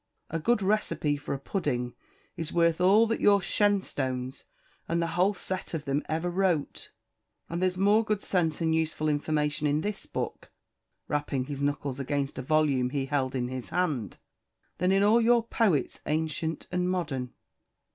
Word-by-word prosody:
A 165 - -1
good 210 +5 +2
recipe 190 -7 +1
for 145 -1 -4
a - - -6
pudding 130 - -2 0.4
is 165 -1 -4
worth 170 0 +2
all 200 +5 +6
that 230 0 -1
your 200 -1 +6
Shenstones 140 -11 -1 0.4
and 170 +1 0
the 170 - +1
whole 190 +3 +2
set 185 -2 -4
of 155 -1 -4
them 140 +1 0
ever 160 +3 -1
wrote; 175 -4 0 0.6
and 170 +1 -3
there's 185 0 +1
more 205 +4 +4
good 215 -2 -1
sense 165 -4 0
and 160 -1 +2
useful 160 -1 0
information 150 0 0
in 145 +1 +1
this 205 +1 -4
book" - - -5 0.6
rapping 145 -3 -1
his 140 0 -5
knuckles 140 -2 -1
against 140 0 -2
a - - -2
volume 140 -3 +2
he 135 0 -1
held 135 -2 -1
in 125 -1 -1
his 130 -1 -6
hand 145 - -1 0.6
"than 180 +1 +2
in 195 +1 +4
all 220 +3 +5
your 235 0 +4
poets, 215 - +1
ancient 160 +1 -1
and 180 0 0
modern." 145 -9 -2
160 Hz, 165 wpm, -28 LUFS, 140-185 Hz, 0.6 s, all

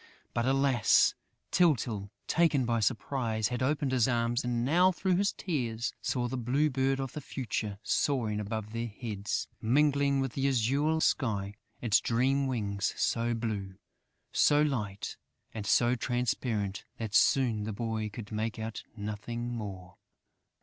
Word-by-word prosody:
But 115 +1 0
alas, 135 -4 +4 0.4
Tyltyl, 120 - +2 0.2
taken 155 -6 +3
by 115 -1 +1
surprise, 110 -1 0
had 125 0 -3
opened 140 +1 +1
his 125 -2 +3
arms 120 0 +1
and 120 -1 0
now, 180 +7 +5
through 185 0 0
his 200 +1 +2
tears, 120 - -2
saw 120 -1 -1
the 130 +2 -3
Bird 135 +1 +1
of 135 -1 -4
the 150 - -5
Future 110 -6 -3
soaring 115 -7 0
above 110 +1 -4
their 115 +1 -2
heads, 105 -2 -4
mingling 140 +3 +3
with 135 -3 -1
the 135 0 0
azure 140 +5 +2
sky 100 -10 0 0.3
its 115 -2 +4
dream 135 +4 +1
wings 100 -6 -1
so 120 0 +1
blue, 105 -5 -3 0.6
so 150 0 +4
light 105 -9 -2 0.4
and 105 -2 -5
so 120 0 +4
transparent 120 -5 -1
that 110 -2 -5
soon 120 -7 +3
the 110 - -3
boy 110 0 -2
could 105 0 -9
make 110 +1 -2
out 110 0 -5
nothing 115 +3 -4
more.... 95 -5 -7
120 Hz, 145 wpm, -30 LUFS, 110-135 Hz, 0.6 s, now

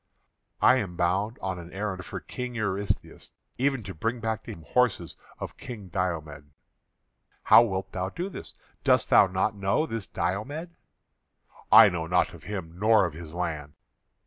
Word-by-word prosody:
"I 130 - +7
am 95 -8 -3
bound 95 +6 0
on 95 -2 -2
an 85 0 -10
errand 95 -2 -4
for - - -6
King 125 -1 -6
Eurystheus; 100 -3 -3 0.3
even 135 -2 +1
to 95 0 -7
bring 115 +8 -2
back 110 -1 -2
to 115 - -6
him 85 -7 -10
horses 120 -5 +1 0.2
of - - -7
King 105 -7 -8
Diomed." 80 -6 -3 0.9
"How 110 - +8
wilt 95 -4 -2
thou 95 0 -3
do 175 - -4
this? 200 - -9 0.3
Dost - - +3
thou 100 - +7
not 95 +3 0
know 100 +9 0
this 115 - -5
Diomed?" 145 - -3 1.0
"I - - +10
know 85 -2 -3
naught 90 +1 +2
of 85 - -13
him, 90 -5 -6
nor 110 0 +5
of 85 - -4
his 80 0 -9
land." 80 -5 -3
95 Hz, 165 wpm, -27 LUFS, 90-115 Hz, 1.0 s, I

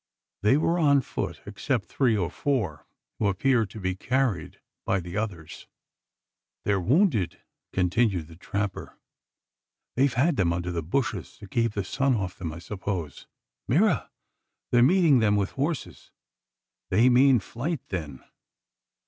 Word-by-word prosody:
They 105 +7 +4
were 170 +3 +1
on 140 -3 +4
foot - - -5
except 105 +3 -2
three 120 -6 +1
or 90 -4 -1
four, 115 - -2 0.3
who 105 - +2
appeared 110 +2 +2
to 110 - -9
be 95 -1 -1
carried 125 +1 -1 0.2
by 95 0 +1
the 90 0 -7
others. 100 -8 -5 1.0
"Their 100 -2 +2
wounded!" 115 - +2 0.3
continued 95 -2 +1
the 80 - -13
trapper. 100 +2 -4 1.0
"They've 135 +2 +3
had 140 +6 +2
them 85 -3 +2
under 90 +1 -3
the 85 -1 -2
bushes 120 - -2
to 105 - -11
keep 115 +2 0
the 100 - -2
sun 135 +7 +1
off 95 -4 -3
them, 85 -4 -4
I 80 - -8
suppose. 90 -4 -5 0.4
Mira! - - +2 0.6
they 120 - +4
are - - +6
meeting 155 0 +5
them 105 -2 +3
with 100 -1 0
horses! 145 +2 -4 0.8
They 110 +7 +4
mean 130 0 +5
flight 125 - -4
then." 75 -8 -5
105 Hz, 145 wpm, -26 LUFS, 90-130 Hz, 1.0 s, are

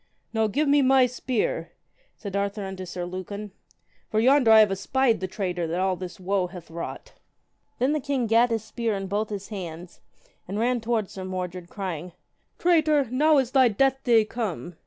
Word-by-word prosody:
Now 220 -1 +2
give 290 +9 0
me 285 0 +5
my 265 -1 +5
spear, 260 - -2 0.4
said 200 -3 -7
Arthur 200 +1 -1
unto 190 -1 -6
Sir 175 0 -5
Lucan, 190 +3 -6 0.6
for 215 - +1
yonder 255 +1 +4
I 220 0 +9
have 210 -2 +4
espied 240 +5 +1
the 185 - -3
traitor 180 -3 -3
that 170 +3 -2
all 190 0 +1
this 180 0 -8
woe 190 0 0
hath 175 -2 -11
wrought. 170 +1 -7 0.6
Then 265 +4 +1
the 305 - 0
king 275 -3 -1
gat 230 +2 +4
his 225 -2 -1
spear 225 -1 -2
in 195 0 -4
both 205 +3 -2
his 200 -1 -6
hands, 175 -4 -8 0.5
and 195 +3 -4
ran 240 +2 +1
toward 225 -3 -1
Sir 190 - -7
Mordred, 180 -1 -5
crying, 180 -3 -5 0.4
Traitor, 310 -6 +3
now 300 +4 +4
is 260 -3 +1
thy 260 -2 +5
death 265 +5 +1
day 230 -3 +4
come. 200 -7 -4
215 Hz, 185 wpm, -25 LUFS, 185-255 Hz, 0.6 s, I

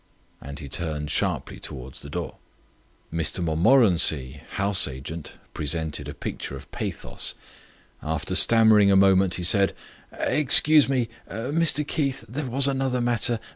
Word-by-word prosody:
And 70 +2 -9
he 70 - -8
turned 75 0 -4
sharply - - -2
towards 65 +1 -9
the 70 - -10
door. 85 +2 -6 0.8
Mr 85 +2 -1
Montmorency, 80 - +2
House 100 -3 +1
Agent, 70 +4 -8 0.2
presented 80 +1 -2
a - - -8
picture - - -6
of - - -13
pathos. - - -3 0.7
After 80 +3 -4
stammering 110 0 +5
a 100 - +4
moment 95 -1 +3
he 90 - -4
said: 100 +2 +2 0.4
"Excuse 150 0 +5
me... 130 -4 0 0.2
Mr 145 +6 -1
Keith... 140 -3 -2
there 130 +4 -5
was 135 +3 +1
another 135 -2 -1
matter... 120 -1 0
95 Hz, 135 wpm, -24 LUFS, 80-125 Hz, 0.8 s, stammering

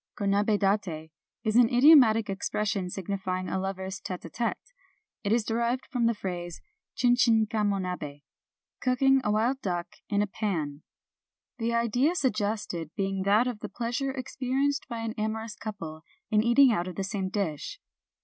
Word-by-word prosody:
Konabi 205 +1 +2
date 195 -6 -1 0.3
is 215 -1 0
an 240 -1 +6
idiomatic 245 -5 +6
expression 195 -1 -2
signifying 185 0 -3
a 190 - -1
lovers' 190 0 -4
t§te 180 -1 -6
k 165 - -8 0.2
t§te. - - +1 0.7
It 200 - -1
is 230 -1 +2
derived 235 +3 0
from 240 -3 +2
the 230 - +1
phrase, 175 -4 -5 0.4
Chin 245 -1 +4
chin 225 -3 +4
kamo 210 -2 0
nabS 155 -6 -5 0.6
("cooking 270 +1 +3
a - - 0
wild 240 +6 +1
duck 175 -3 -3
in 205 0 +2
a - - +1
pan 170 -9 -3 0.3
"), - - -66
— - - -66
the 235 0 0
idea 245 +8 +2
suggested 210 - -1
being 195 -1 -1
that 210 +4 +4
of 245 -4 -3
the - - -6
pleasure 245 +3 -2
experienced 270 +1 -1
by 235 -3 -5
an 225 -1 -3
amorous 220 0 -3
couple 165 -8 -7 0.3
in 215 -1 +4
eating 240 +3 +6
out 175 -5 0
of 180 - -6
the 195 - -2
same 190 -1 -2
dish. 195 - -3
210 Hz, 170 wpm, -28 LUFS, 190-235 Hz, 0.7 s, an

